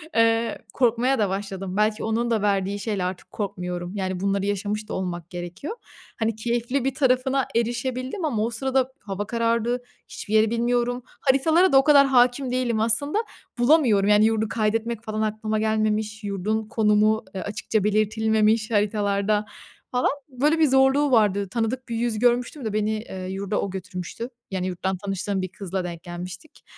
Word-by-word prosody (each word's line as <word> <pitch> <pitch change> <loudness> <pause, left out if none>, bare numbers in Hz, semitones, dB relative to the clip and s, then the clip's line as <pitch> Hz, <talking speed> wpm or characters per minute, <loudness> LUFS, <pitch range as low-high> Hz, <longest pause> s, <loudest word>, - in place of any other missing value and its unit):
Eee, 230 0 +3 0.2
korkmaya 245 +1 +2
da 205 -3 +2
başladım. 195 -1 -4
Belki 215 +1 +1
onun 230 +2 0
da 220 - +1
verdiği 200 0 0
şeyle 200 -3 -2
artık 180 0 -5
korkmuyorum. 180 -2 -4
Yani, 185 -2 -2
bunları 195 +1 0
yaşamış 205 +1 -2
da - - -4
olmak 175 -2 -4
gerekiyor. 175 - -6 0.4
Hani, 225 -1 0
keyifli 240 +3 -1
bir 270 - 0
tarafına 265 -1 +2
erişebildim 255 - -1
ama 225 -8 0
o 230 - 0
sırada 265 +2 0
hava 200 0 -5
karardı. 235 +1 0 0.3
Hiçbir 210 - -7
yeri 220 0 +5
bilmiyorum. 240 +1 0 0.2
Haritalara 315 +7 +3
da 270 - +8
o 270 - +6
kadar 280 -2 +6
hâkim 250 0 +3
değilim 245 -3 0
aslında. 230 - +2 0.4
Bulamıyorum, 240 -7 +4
yani, 210 +1 +6
yurdu 220 0 +1
kaydetmek 225 +1 -1
falan 215 -1 -3
aklıma 215 0 -1
gelmemiş. 215 0 0
Yurdun 210 +2 -2
konumu, 215 0 +2
ııı, 185 - -3
açıkça 205 0 -2
belirtilmemiş 215 +1 +2
haritalarda 205 0 +1 0.5
falan. 250 0 +2 0.2
Böyle 295 +5 +1
bir 310 - +5
zorluğu 270 +2 +4
vardı. 200 -4 +3
Tanıdık 235 +4 -2
bir 230 - -2
yüz 230 -2 -1
görmüştüm 245 +2 +1
de 215 - -2
beni, 215 0 +1
eee, 190 -4 -5
yurda 195 +2 -2
o 200 - -2
götürmüştü. 190 +4 -6 0.2
Yani, 185 -1 -2
yurttan 185 +1 -2
tanıştığım 195 0 -3
bir 185 - -2
kızla 190 -1 -4
denk 170 -1 -6
gelmiştik. 180 - -9
220 Hz, 160 wpm, -24 LUFS, 200-245 Hz, 0.5 s, da